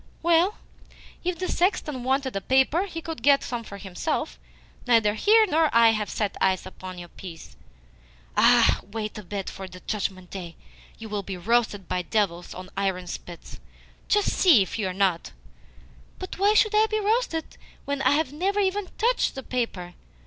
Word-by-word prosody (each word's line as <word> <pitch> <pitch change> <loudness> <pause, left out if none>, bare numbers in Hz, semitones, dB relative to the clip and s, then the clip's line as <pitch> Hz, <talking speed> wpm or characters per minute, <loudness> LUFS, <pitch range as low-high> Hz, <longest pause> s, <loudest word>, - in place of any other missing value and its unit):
"Well, 340 +4 +3 0.7
if 355 -1 -1
the 370 - -3
sexton 305 -9 0
wanted 265 +1 0
paper 265 +8 +3
he 330 -3 -7
could 325 -7 -6
get 280 +2 +4
some 240 -2 -4
for 200 -2 -9
himself. 180 - -3 0.5
Neither 225 -4 +4
he 435 - +5
nor 320 -4 +2
I 230 0 +6
have 215 -2 -1
set 210 -2 -2
eyes 190 -1 +2
upon 185 -1 -9
your 175 -1 -9
piece." 165 - -11 0.8
"Ah! - - +5
Wait 215 +1 -6
a - - -9
bit, 195 +1 -5
for - - -7
on - - -10
the 185 0 -11
Judgment 190 -3 -4
Day 175 -3 -7 0.4
you 225 - -8
will 210 -1 -3
be 195 -1 -6
roasted 210 0 0
by 180 - -1
devils 180 -3 -1
on 185 0 -9
iron 190 -2 -1
spits. 175 0 -9 0.5
Just 415 -1 +2
see 310 - +6
if 190 - -6
you 205 - 0
are - - -2
not!" 185 -3 0 0.8
"But 370 0 -7
why 410 +2 +4
should 430 0 +4
I 430 +1 +4
be 435 0 0
roasted 420 -6 -1 0.3
when 280 -1 -2
I - - +4
have 290 -2 0
never 390 +6 0
even 395 0 0
TOUCHED 480 +2 +1
the 265 - -6
paper? 205 -9 -3
230 Hz, 180 wpm, -25 LUFS, -, 0.8 s, I